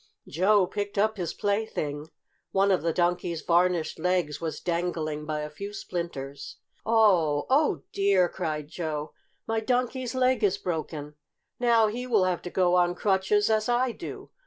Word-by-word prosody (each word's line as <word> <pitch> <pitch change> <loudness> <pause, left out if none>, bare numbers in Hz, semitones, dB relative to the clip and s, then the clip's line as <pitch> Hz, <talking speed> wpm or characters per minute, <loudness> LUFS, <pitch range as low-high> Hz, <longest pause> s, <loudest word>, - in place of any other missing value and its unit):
Joe 190 +4 +3
picked 205 +2 -4
up 215 +1 +2
his 175 -4 -2
plaything. 180 -8 -2 0.4
One 195 +1 +2
of 185 - +2
the 165 +1 0
Donkey's 175 -1 0
varnished 175 -2 +1
legs 175 -3 0
was 160 -3 -3
dangling 165 -3 -2
by 155 -1 -2
a 150 - -5
few 200 +7 -7
splinters. 145 -8 -6 0.3
"Oh! 185 -10 +3
Oh, 295 +3 +3
dear!" 195 -2 +3
cried 155 -5 -4
Joe. 155 -2 -4 0.3
"My 225 0 0
Donkey's 250 +2 -1
leg 255 -2 +2
is 200 -1 +3
broken! 155 -5 -4 0.5
Now 235 -2 +4
he 240 +4 -3
will 220 -6 +3
have 185 -2 0
to 175 - -6
go 180 -1 +2
on 175 0 +3
crutches 200 +2 +2
as 215 +1 +1
I 245 +1 +2
do! - - -9
180 Hz, 160 wpm, -27 LUFS, 160-215 Hz, 0.5 s, Now